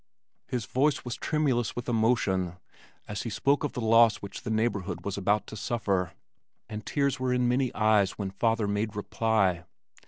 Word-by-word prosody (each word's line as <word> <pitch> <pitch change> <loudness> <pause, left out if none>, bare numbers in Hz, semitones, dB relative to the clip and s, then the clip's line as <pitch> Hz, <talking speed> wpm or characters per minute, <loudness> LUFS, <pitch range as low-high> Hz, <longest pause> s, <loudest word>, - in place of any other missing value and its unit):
His 125 -4 -2
voice 140 +8 +1
was 120 - -3
tremulous 135 -6 0
with 120 - -5
emotion 105 -7 +1 0.5
as 105 - -4
he 115 - -4
spoke 140 +8 +1
of 145 - -2
the 125 - -4
loss 115 0 +5
which 100 - -8
the - - -5
neighborhood 105 -5 -1
was 100 - -2
about 100 +2 +1
to - - -9
suffer, 100 -5 -1 0.5
and 110 0 -6
tears 140 -1 0
were 130 0 0
in 125 -1 +2
many 125 +1 +1
eyes 105 -3 +3
when 100 -2 -3
father 115 +1 +1
made 105 +1 -1
reply. 105 -4 +1
110 Hz, 175 wpm, -28 LUFS, 100-125 Hz, 0.5 s, loss